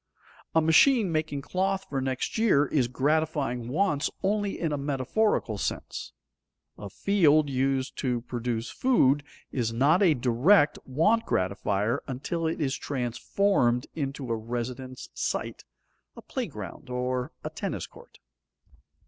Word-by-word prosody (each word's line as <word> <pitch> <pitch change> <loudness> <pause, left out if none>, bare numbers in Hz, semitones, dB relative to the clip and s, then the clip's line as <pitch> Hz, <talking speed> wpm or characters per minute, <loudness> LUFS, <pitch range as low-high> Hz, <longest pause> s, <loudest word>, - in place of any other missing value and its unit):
A 160 - +6
machine 195 - +5
making 155 -3 -2
cloth 190 +4 -1
for 135 -2 -2
next 130 -1 -2
year 190 -11 +4
is 135 -4 +1
gratifying 140 -2 0
wants 150 -1 +1
only 205 0 0
in 165 -3 -1
a 145 - -1
metaphorical 140 - 0
sense. - - -4 0.6
A 100 - -8
field 155 - +3
used 135 0 0
to 125 -3 0
produce 120 -1 -3
food 145 - +3 0.3
is 120 -4 -1
not 140 - +3
a 170 -6 +5
direct 140 - +3
want 185 - +2
gratifier 100 +5 0
until 160 +6 -2
it 160 - -2
is 140 -3 0
transformed 125 - 0
into 135 -4 -4
a - - +2
residence 120 +3 -5
site, - - -3 0.5
a - - -10
playground, - - -6
or 125 0 -2
a - - -4
tennis - - -4
court. - - -17
140 Hz, 130 wpm, -27 LUFS, 125-165 Hz, 0.6 s, A